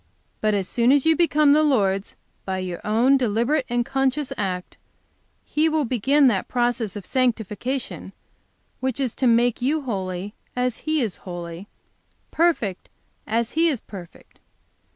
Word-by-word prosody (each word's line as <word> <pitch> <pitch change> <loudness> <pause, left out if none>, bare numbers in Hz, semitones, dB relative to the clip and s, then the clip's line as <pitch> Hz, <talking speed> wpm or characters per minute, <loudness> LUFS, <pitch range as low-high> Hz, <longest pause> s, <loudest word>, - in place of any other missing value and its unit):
As 205 -3 +1
soon 240 +1 +2
as 285 0 +3
you 320 0 +5
become 305 -4 +4
the 305 - +5
Lord's 200 -10 +1 0.3
by 190 -1 -3
your 180 -2 -4
own 240 +6 +3
deliberate 245 +4 0
and 240 0 0
conscious 270 +2 0
act, 185 -3 -3 0.7
He 310 +2 +1
will 310 -2 +1
begin 265 +5 +3
that 210 -8 +2
process 240 -4 -1
of 205 -3 -7
sanctification 250 0 -2 0.7
which 260 0 -2
is 260 -4 -1
to 260 - +1
make 240 0 +3
you 295 +5 +1
holy 190 -4 -4 0.2
as 250 -1 0
He 310 -3 +2
is 215 -5 -3
holy, 175 +1 -8 0.6
perfect 310 - 0 0.4
as 230 +1 0
He 330 +2 +3
is 275 -7 -1
perfect. 185 -6 -12
240 Hz, 145 wpm, -23 LUFS, 205-275 Hz, 0.7 s, you